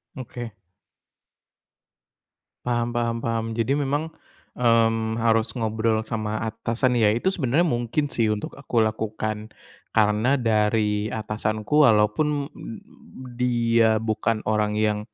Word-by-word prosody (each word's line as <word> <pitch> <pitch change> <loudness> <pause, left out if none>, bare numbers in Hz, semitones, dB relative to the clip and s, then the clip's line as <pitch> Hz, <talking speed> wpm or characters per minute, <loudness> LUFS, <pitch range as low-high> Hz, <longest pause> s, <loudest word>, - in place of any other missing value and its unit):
Oke. 120 -2 -7 2.1
Paham 120 -1 0
paham 115 -1 -1
paham, 115 -1 -1
jadi 120 +5 0
memang, 145 +3 -1 0.5
mmm, 115 -1 +2
harus 115 0 +2
ngobrol 110 -1 0
sama 110 -1 -3
atasan, 115 +3 -1
ya 105 -3 +4
itu 120 +11 +1
sebenarnya 160 -2 +1
mungkin 120 +4 -1
sih 115 -4 0
untuk 105 - -6
aku 125 -5 0
lakukan 110 0 -3 0.5
karena 110 +3 +3
dari 105 -2 +1
atasanku 110 +6 +1
walaupun 140 +7 +2 0.9
dia 115 -2 +3
bukan 110 0 -1
orang 105 -1 +1
yang 105 -1 +1
115 Hz, 105 wpm, -24 LUFS, 110-120 Hz, 2.1 s, ya